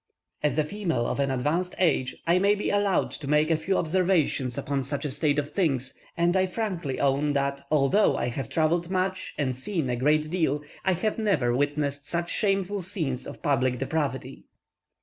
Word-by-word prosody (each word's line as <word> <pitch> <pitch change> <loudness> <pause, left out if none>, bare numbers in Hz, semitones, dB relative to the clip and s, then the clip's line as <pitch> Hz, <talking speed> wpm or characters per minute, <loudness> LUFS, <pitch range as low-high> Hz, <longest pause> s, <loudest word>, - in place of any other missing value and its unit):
As 145 -2 0
a 155 - +4
female 165 - -2
of - - -2
an 140 -1 +1
advanced 150 +8 -1
age, 145 -7 +1
I 175 +2 +4
may 200 +2 +4
be 210 - -2
allowed 205 -2 +1
to 145 - -7
make 150 +2 +3
a - - +5
few 180 +5 0
observations 165 -7 +1
upon 140 -1 -1
such 140 +3 -4
a 145 - -2
state 145 +1 +1
of 145 0 -1
things, 140 -8 0 0.2
and 170 +1 +2
I 190 0 +3
frankly 180 - -3
own 140 +1 +2
that, 140 0 -1
although 155 +8 +3
I - - -1
have 120 -1 -4
travelled 165 +2 +1
much 185 0 -2
and 130 -4 0
seen 145 -1 -2
a - - 0
great 150 +4 +2
deal, 155 -5 0 0.2
I 185 -2 +2 0.2
never 160 - +2
witnessed 145 0 -1
such 170 0 -2
shameful 195 -1 +1
scenes 165 - -2
of - - -10
public 130 -3 +1
depravity. 135 - -3
150 Hz, 185 wpm, -26 LUFS, 140-185 Hz, 0.2 s, a